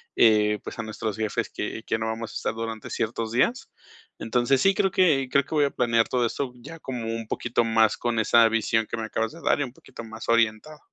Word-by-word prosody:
eh, 105 -2 +4
pues - - -8
a - - -2
nuestros 110 -1 -4
jefes 110 -1 -2
que 110 - -5
que - - 0
no 110 - -2
vamos 115 0 -4
a - - -12
estar - - -2
durante 115 -1 -5
ciertos 115 -1 -2
días. 245 - +1 0.5
Entonces, 125 +3 +1
sí 195 0 +4
creo 195 0 +2
que 150 -9 +3
creo 140 -1 +3
que 150 - -5
voy 150 -1 +4
a 140 - -1
planear 115 -2 +2
todo 125 -2 +1
esto 130 +3 -3
ya 165 +7 -10
como 125 -6 -5
un 115 -1 -6
poquito 120 +1 0
más, 110 -1 +3
con 120 -2 -1
esa 115 +1 +5
visión 115 0 +1
que - - -4
me 110 - -3
acabas 110 +1 -2
de 165 - -12
dar, - - +2
y - - +1
un 125 -3 -7
poquito 115 - -12
más 110 0 -9
orientada. 115 +6 +1
115 Hz, 235 wpm, -25 LUFS, 110-130 Hz, 0.5 s, esa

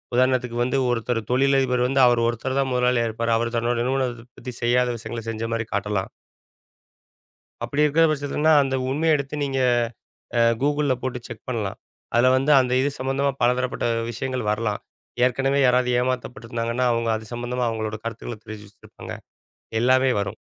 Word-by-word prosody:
உதாரணத்துக்கு 125 -1 +1
வந்து, 130 +3 0
ஒருத்தரு 120 -1 -1
தொழிலதிபரு 130 -1 +2
வந்து, 135 +1 +2
அவர் 120 -1 +3
ஒருத்தரு 120 +3 -2
தான் 135 -1 0
முதலாளியா 125 -1 +2
இருப்பாரு. 115 +1 -1
அவரு 115 +1 -2
தன்னோட 120 +1 0
நிறுவனத்த 125 -3 -1
பத்தி, 125 0 -7
செய்யாத 125 +1 +3
விஷயங்கள, 115 0 -6
செஞ்ச 115 0 -3
மாரி 115 0 -1
காட்டலாம். 100 -1 -2 1.5
அப்படி 145 +1 0
இருக்கிற 150 +3 +3
பட்சத்துலன்னா, 150 +2 +1
அந்த 135 -1 -1
உண்மையை 155 +4 +2
எடுத்து, 140 +1 -5
நீங்க 135 -1 -1 0.8
அ - - +5 0.2
Googleல 145 -1 +2
போட்டு 130 -1 -3
செக் - - -10
பண்ணலாம். 105 -5 -3 0.4
அதுல 120 +2 +5
வந்து, 135 +3 +2
அந்த 125 0 -1
இது 140 - +1
சம்மந்தமா 135 +2 0
பலதரப்பட்ட 125 +1 +1 0.3
விஷயங்கள் 125 -2 -3
வரலாம். 105 -1 -2 0.4
ஏற்கனவே 135 +2 +1
யாராவது 125 0 +3
ஏமாத்தப்பட்டிருந்தாங்கன்னா, 120 -1 -2
அவங்க 115 0 -1
அது 110 0 -6
சம்மந்தமா, 120 +1 -2
அவங்களோட 110 -1 -3
கருத்துக்கள 115 0 -5
தெரிவிச்சுச்சிருப்பாங்க. 105 -1 -10 0.7
எல்லாமே 130 +1 +4
வரும். 100 +2 -4
125 Hz, 145 wpm, -23 LUFS, 115-135 Hz, 1.5 s, அ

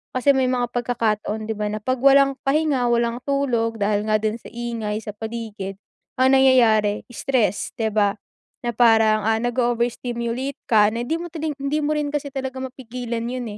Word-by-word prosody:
Kasi 255 +3 +4
may 265 -2 +2
mga 245 -1 -1
pagkakataon 220 -3 -1
'di 220 - -1
ba, 210 - -2
na 215 - -3
'pag 255 +2 0
walang 275 +1 +5
pahinga, 285 -3 +2
walang 235 0 +1
tulog 245 -5 0
dahil 205 0 +1
nga 215 - +2
din 215 +1 -1
sa - - -13
ingay 230 -3 -3
sa 210 - -5
paligid, 220 -3 -6 0.4
ang 260 +1 +4
nangyayari 225 -6 +4
stress, 240 -6 0
'di 220 -1 -1
ba? 205 -1 +2 0.5
Na 240 - -1
parang, 220 -2 +4
ah, 225 0 +3
nag-o-overstimulate 240 +1 -1
ka 210 -2 +5
na 235 +1 -2
hindi 280 - -2
mo 345 - -5
tining 315 -2 -3
hindi 280 +2 0
mo 300 +1 +1
rin 295 -1 -1
kasi 285 -1 -3
talaga 265 -1 -4
mapigilan 245 -2 -5
yun, 250 0 -4
240 Hz, 175 wpm, -22 LUFS, 220-265 Hz, 0.5 s, walang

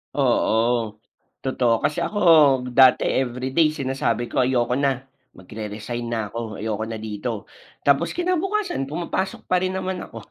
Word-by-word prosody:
Oo, 115 -1 +1 0.4
totoo. 130 -3 +1
Kasi 150 - 0
ako 210 - -3 0.6
dati 130 -1 +7 0.2
everyday 130 +6 +1
sinasabi 130 -5 -1
ko 130 - +1
ayoko 125 -1 +1
na, 135 -1 0 0.3
magre-resign 110 +4 -6
na 110 -2 -1
ako. 110 0 -6
Ayoko 110 0 -2
na 110 - -4
dito. 110 0 -5 0.4
Tapos 140 +4 +3
kinabukasan 365 - -1
pumapasok 175 +4 -3
pa 185 - +2
rin 185 - 0
naman 190 -1 -3
ako. - - -11
125 Hz, 135 wpm, -23 LUFS, 110-150 Hz, 0.6 s, dati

